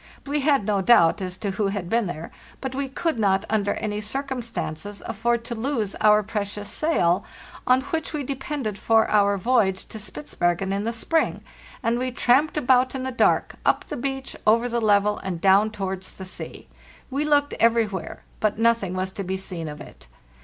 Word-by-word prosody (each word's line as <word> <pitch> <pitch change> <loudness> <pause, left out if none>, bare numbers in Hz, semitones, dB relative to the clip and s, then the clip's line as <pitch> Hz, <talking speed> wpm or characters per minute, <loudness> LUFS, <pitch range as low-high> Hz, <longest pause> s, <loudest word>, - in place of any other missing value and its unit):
We 290 +1 -1
had 280 -6 +2
no 205 -2 +1
doubt 190 -4 +5
as 185 -1 -4
to 200 +1 -2
who 200 +1 0
had 195 -3 -3
been 230 +2 +1
there, 165 -1 -6 0.3
but 265 -1 -4
we 275 0 -2
could 315 -1 -1
not 195 -1 +2
under 205 -2 +1
any 210 -1 -3
circumstances 230 - -4
afford 235 +2 -1
to 235 - -4
lose 230 -3 -2
our 210 0 +5
precious 205 -1 -4
sail, 185 - +1 0.4
on 255 +1 +5
which 320 +3 -3
we 300 -2 -3
depended 270 -5 -4
for 225 0 +3
our 200 -1 +4
voyage 195 -3 +1
to 220 - -7
Spitzbergen 175 0 -2
in 200 +2 -2
the 230 - 0
spring, 315 +8 0 0.4
and 230 +1 +1
we 255 +1 -1
tramped 260 +6 +2
about 255 -2 +3
in 260 - -3
the 260 - -2
dark, 250 - +2
up - - +2
the - - -3
beach, 270 +1 -4
over 230 +3 +4
the 235 -1 -1
level, 210 -1 +3
and 185 -3 -4
down 195 +4 +4
towards 190 -3 -4
the 190 - -7
sea. 185 - -5 0.4
We 280 +3 0
looked 290 -1 +2
everywhere, 225 -5 +1 0.2
but 215 -1 +1
nothing 225 -5 +2
was 185 0 -2
to 195 - -5
be 190 +1 -2
seen 180 -4 -4
of 150 0 -7
it. - - -13
215 Hz, 190 wpm, -24 LUFS, 195-255 Hz, 0.4 s, doubt